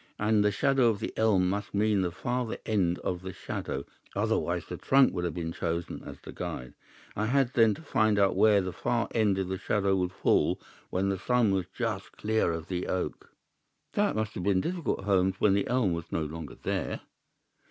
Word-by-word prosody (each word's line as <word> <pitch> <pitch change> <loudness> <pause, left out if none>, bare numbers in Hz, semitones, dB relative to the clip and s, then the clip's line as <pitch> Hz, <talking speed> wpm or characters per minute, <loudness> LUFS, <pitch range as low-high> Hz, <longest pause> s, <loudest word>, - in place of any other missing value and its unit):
And 105 0 +3
the 105 - +4
shadow 135 +4 +3
of 110 -3 +1
the - - -4
elm 100 -5 +3
must 100 +2 -3
mean 105 -1 +3
the 90 - 0
farther 120 +6 -2
end 90 -5 +1
of 90 -1 -2
the 95 0 -6
shadow, 70 -4 -4 0.3
otherwise - - 0
the - - -6
trunk 135 0 +4
would 90 -1 -2
have 85 - -3
been 85 -2 -3
chosen 85 0 -3
as - - -9
the - - -9
guide. 65 0 -6 0.4
I 105 +1 0
had, 130 0 +2
then, 115 -3 +5
to - - -12
find 110 -7 +2 0.2
where 105 -2 +5
the 90 -1 -4
far 120 -1 -1
end 105 -4 +2
of 95 -1 -1
the 95 0 -3
shadow 100 -2 +1
would 90 -1 0
fall 95 - +2 0.3
when 95 +2 0
the 95 -1 -1
sun 120 -1 +2
was 95 -3 0
just 110 -5 -3
clear 110 -4 +1
of 80 +1 -4
the 90 -1 -3
oak." 95 - -3 0.6
"That - - +1
must 110 0 -1
have - - -5
been 95 -1 +3
difficult, 170 - -2
Holmes, 95 -1 +2
when 105 - +4
the 100 0 +1
elm 120 -8 +2
was 85 -1 -5
no 80 - 0
longer 75 -2 -6
there." - - -3
100 Hz, 205 wpm, -29 LUFS, 90-110 Hz, 0.6 s, then